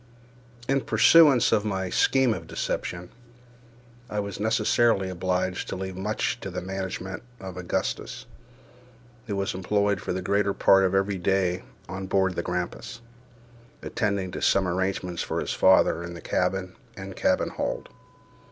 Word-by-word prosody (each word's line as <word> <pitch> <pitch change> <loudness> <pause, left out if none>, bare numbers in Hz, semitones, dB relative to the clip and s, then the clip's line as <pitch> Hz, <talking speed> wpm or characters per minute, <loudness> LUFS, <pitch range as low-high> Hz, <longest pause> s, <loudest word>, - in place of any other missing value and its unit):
In 135 0 +2
pursuance 130 +4 +6
of 105 - +3
my 95 -3 -2
scheme 130 -3 +3
of - - -7
deception, 90 0 -4 1.0
I 105 - -2
was 100 -1 -4
necessarily 110 -2 +2
obliged 95 0 -1
to - - -3
leave 95 0 -5
much 105 +4 -2
to 95 - -6
the 90 - -4
management 95 +1 -5 0.2
of 95 -2 -8
Augustus, 90 -1 -3 1.0
who 100 - -2
was 100 0 -1
employed 100 +1 0
for - - -4
the 90 0 -3
greater 100 +1 +1
part 95 0 +5
of 95 - +1
every 95 0 +1
day 90 -1 +1 0.2
on 95 +1 -5
board 95 -1 +2
the 85 - -1
Grampus, 90 +6 -4 0.8
attending 100 -4 -1
to - - -6
some 95 -1 +3
arrangements 90 -1 -2
for - - -2
his - - -2
father 95 -2 +4
in 85 0 -7
the - - -8
cabin 95 +3 -1 0.2
and 95 -1 -7
cabin - - +1
hold. - - -4
95 Hz, 150 wpm, -26 LUFS, 90-105 Hz, 1.0 s, pursuance